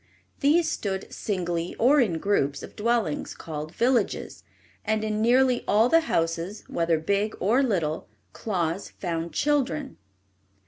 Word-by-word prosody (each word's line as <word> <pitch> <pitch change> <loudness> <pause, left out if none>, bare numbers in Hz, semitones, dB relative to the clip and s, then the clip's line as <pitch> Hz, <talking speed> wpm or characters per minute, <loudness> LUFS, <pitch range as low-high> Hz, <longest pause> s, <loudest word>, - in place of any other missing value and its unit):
These 315 +4 +3
stood 195 -10 -3
singly 175 -4 -2
or 275 +5 +5
in 185 -9 +1
groups 145 -7 0
of - - -10
dwellings 225 -7 -1
called 155 -1 -6
villages, 240 -3 0 0.4
and 220 0 0
in 215 0 -1
nearly 250 +2 +3
all 220 +4 +4
the 330 - +6
houses, 165 +5 -1
whether 165 -1 +1
big 200 +6 0
or 225 +8 +3
little, 170 - -1 0.3
Claus 180 -3 -2
found 170 -2 -4
children. 290 -1 0
205 Hz, 130 wpm, -26 LUFS, 170-240 Hz, 0.4 s, the